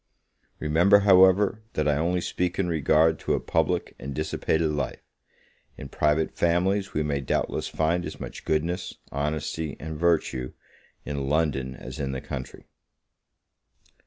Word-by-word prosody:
Remember, 85 +7 +4
however, 95 +2 +5
that 75 -1 0
I 75 - +3
only 90 +3 0
speak 90 0 -2
in 95 - +1
regard 80 -1 +3
to - - 0
a - - -1
public 80 +2 0
and 70 +2 -6
dissipated 80 +3 0
life; 75 - -3 0.7
in 70 - -8
private 75 +3 +1
families 95 +4 +1
we 75 - +1
may 70 -2 -1
doubtless 65 - -1
find 85 +3 0
as - - -7
much - - -8
goodness, 85 +4 -1 0.2
honesty, 75 +1 -3
and 80 -1 -6
virtue, 80 -7 +1 0.5
in 70 -2 -3
London 70 -4 0
as 65 +3 -9
in 70 -2 -2
the 65 - -3
country. 65 0 -7
80 Hz, 140 wpm, -26 LUFS, 75-90 Hz, 0.7 s, however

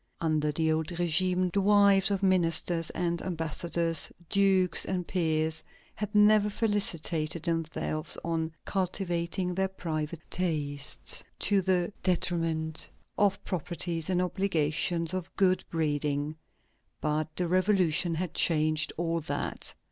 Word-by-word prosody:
Under 155 -2 0
the 160 +1 +1
old 160 0 0
régime, 180 +1 +1
the 200 - +2
wives 200 -1 +5
of 200 -1 -1
ministers 170 -2 +1
and 170 -1 -2
ambassadors, 165 -1 0 0.2
dukes 190 -2 +4
and 180 -2 -2
peers, 160 -2 0 0.3
had 210 0 -5
never 210 0 +5
felicitated 170 -7 0
themselves 160 -2 -2
on 165 -1 -1
"cultivating 180 -1 -2
their 190 +1 0
private 160 -3 -4
tastes" 150 -5 +1
to 200 -2 +2
the 180 0 0
detriment 165 -3 -1 0.3
of 200 -1 +3
the - - -17
proprieties 170 -1 -3
and 180 -1 +1
obligations 170 -2 0
of 185 -1 -5
good 185 -1 +2
breeding. 150 -2 -1 0.6
But 155 0 -2
the 180 - -1
Revolution 180 -2 +2
had 175 0 -3
changed 155 -1 +2
all 165 0 -1
that. 155 - -3
170 Hz, 120 wpm, -29 LUFS, 160-185 Hz, 0.6 s, wives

